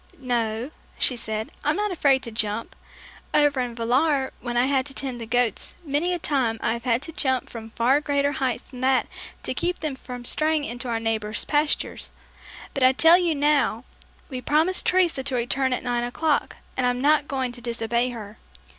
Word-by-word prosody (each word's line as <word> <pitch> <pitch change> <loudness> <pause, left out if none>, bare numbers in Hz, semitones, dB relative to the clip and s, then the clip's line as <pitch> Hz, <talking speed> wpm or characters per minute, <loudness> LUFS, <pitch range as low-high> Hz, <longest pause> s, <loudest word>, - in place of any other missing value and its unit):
"No," 240 -1 -2 0.3
she 255 - +4
said, 220 -1 -4
"I'm 300 +2 +1
not 415 +1 -1
afraid 275 -6 +2
to 230 - -5
jump. 215 0 -2 0.6
Over 290 -2 +4
in 245 -2 -2
Villar, 265 +4 +1
when 240 -1 -3
I 245 - +4
had 270 -1 +2
to 270 - -7
tend 255 -3 -3
the 225 - -6
goats, 240 -2 0
many 300 +5 0
a 355 - 0
time 265 -8 0
I 225 - 0
have 235 +1 -7
had 245 +1 +1
to 325 - -5
jump 260 -5 -1
from 225 -1 -8
far 250 +6 +2
greater 285 -1 +1
heights 260 -4 -1
than 255 -1 -11
that 260 0 +2 0.4
to - - -2
keep 355 +1 -1
them 305 -3 -2
from 250 -2 -9
straying 310 +3 +1
into 245 -1 -3
our 230 -1 0
neighbor's 220 -1 -1
pastures; 295 0 0 0.6
but 275 - -3
I 255 0 +6
tell 330 +6 +7
you 340 -3 +1
now, 285 -5 +2 0.4
we 255 -3 -6
promised 320 +7 +3
Teresa 360 -6 +3
to 265 -1 -2
return 260 +2 0
at 250 - -1
nine 240 -1 0
o'clock, 290 +5 0 0.2
and 255 -1 +1
I'm 245 0 0
not 290 +1 +3
going 260 -3 -2
to 240 0 -8
disobey 235 +1 -1
her." 220 -3 -9
260 Hz, 195 wpm, -24 LUFS, 235-290 Hz, 0.6 s, tell